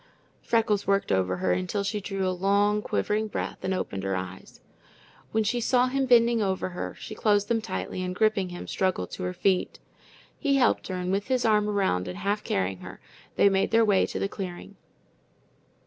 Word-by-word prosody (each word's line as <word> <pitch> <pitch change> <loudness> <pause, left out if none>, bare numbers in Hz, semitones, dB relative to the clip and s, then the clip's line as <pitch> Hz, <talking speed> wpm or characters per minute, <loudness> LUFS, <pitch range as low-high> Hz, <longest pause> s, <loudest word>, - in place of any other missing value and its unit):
Freckles 220 -3 +1
worked 200 0 +1
over 95 -1 +1
her 90 0 0
until 90 - -1
she 205 +1 -2
drew 195 -1 -2
a - - +1
long, 200 +3 +2
quivering 215 +1 -1
breath - - -4
and 190 - -1
opened 100 - -2
her 95 0 -1
eyes. 95 0 -7 0.7
When 220 - +1
she 240 +3 0
saw 250 +2 +3
him 270 0 0
bending 235 -1 +5
above 190 -2 0
her, 180 -1 -4
she - - -8
closed 205 -1 +1
them 230 -1 +1
tightly, 95 - -4
and 180 0 -3
gripping 210 -3 +1
him, 175 0 -8
struggled 185 - -1
to - - -7
her 90 - -1
feet. 185 - 0 0.6
He 280 -3 +2
helped 265 -2 +2
her, 185 - -4
and 180 0 -2
with 195 +1 -1
his 255 -1 +1
arm 210 -1 +3
around 190 - 0
and 180 - -6
half 200 +2 -1
carrying 95 0 -1
her, - - -10 0.4
they - - +5
made 195 -1 +2
their 225 0 +4
way 205 -3 +3
to - - -5
the - - 0
clearing. 190 0 -7
200 Hz, 195 wpm, -27 LUFS, 180-215 Hz, 0.7 s, bending